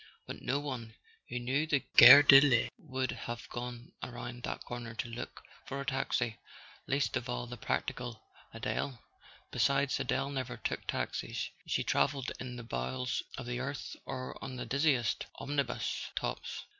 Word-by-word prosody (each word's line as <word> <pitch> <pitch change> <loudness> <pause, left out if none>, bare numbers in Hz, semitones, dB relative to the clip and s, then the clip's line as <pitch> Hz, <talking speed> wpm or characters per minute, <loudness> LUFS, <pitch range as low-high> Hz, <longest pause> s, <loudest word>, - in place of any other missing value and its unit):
But - - -7
no 135 +2 0
one 125 -6 -5 0.3
who 125 - -3
knew 130 +6 0
the 145 -4 +2
Gare 140 +4 +12
de 135 -1 +10
l'Est 130 -5 +3
would 130 -3 -2
have 120 0 -6
gone 120 0 -6
around 120 0 -6
that - - -4
corner 120 -1 -6
to 115 - -3
look 115 +1 -7 0.2
for 140 - -4
a 140 - -4
taxi; 130 -4 0 0.5
least 140 +1 +1
of 120 - -2
all 120 0 -2
the 120 0 -7
practical 120 -2 -3 0.3
Adele. 130 -4 -3 0.5
Besides, 135 +3 +2
Adele 140 - 0
never 130 -3 -3
took - - -3
taxis: - - -2 0.2
she - - +1
travelled 135 -2 +1
in 125 -1 -5
the 120 - -7
bowels 115 - -2 0.2
of 130 - -5
the 120 0 -3
earth 140 +2 -4
or 130 -1 -5
on 130 - -5
the 125 - -4
dizziest 140 -5 +1
omnibus 140 -1 -2
tops. - - -3
125 Hz, 160 wpm, -32 LUFS, 120-135 Hz, 0.5 s, Gare